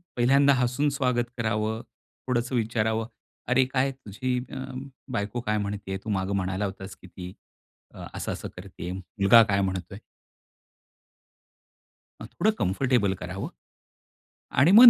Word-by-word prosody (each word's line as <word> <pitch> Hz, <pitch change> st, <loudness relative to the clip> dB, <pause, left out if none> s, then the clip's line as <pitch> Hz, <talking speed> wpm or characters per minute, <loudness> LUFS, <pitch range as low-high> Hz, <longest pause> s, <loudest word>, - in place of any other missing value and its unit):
पहिल्यांदा 135 Hz, +3 st, +5 dB
हसून 125 Hz, +3 st, +2 dB
स्वागत 125 Hz, -3 st, +1 dB
करावं, 110 Hz, 0 st, 0 dB, 0.5 s
थोडंसं 125 Hz, 0 st, 0 dB
विचारावं. 110 Hz, 0 st, +1 dB, 0.4 s
"अरे 130 Hz, +1 st, +4 dB
काय 130 Hz, +1 st, +1 dB
तुझी 125 Hz, 0 st, -2 dB, 0.7 s
बायको 105 Hz, +2 st, -1 dB
काय 105 Hz, -2 st, 0 dB
म्हणतेय 100 Hz, -1 st, -3 dB
तू 110 Hz, -, -5 dB
मागे 95 Hz, 0 st, 0 dB
म्हणाला 95 Hz, +1 st, 0 dB
होतास 95 Hz, 0 st, -6 dB
की 90 Hz, -, -15 dB
ती. 90 Hz, +1 st, -8 dB, 0.8 s
असं-असं -, -, -3 dB
करतेय. 90 Hz, -2 st, -6 dB
मुलगा 100 Hz, +5 st, +5 dB
काय 100 Hz, -1 st, +2 dB
म्हणतोय?" 95 Hz, 0 st, -2 dB, 2.2 s
थोडं 215 Hz, -, 0 dB
कम्फर्टेबल 100 Hz, +1 st, +2 dB
करावं. 90 Hz, +2 st, -4 dB, 1.0 s
आणि 140 Hz, +8 st, +5 dB
मग 235 Hz, +4 st, +12 dB
110 Hz, 115 wpm, -27 LUFS, 95-125 Hz, 2.2 s, मग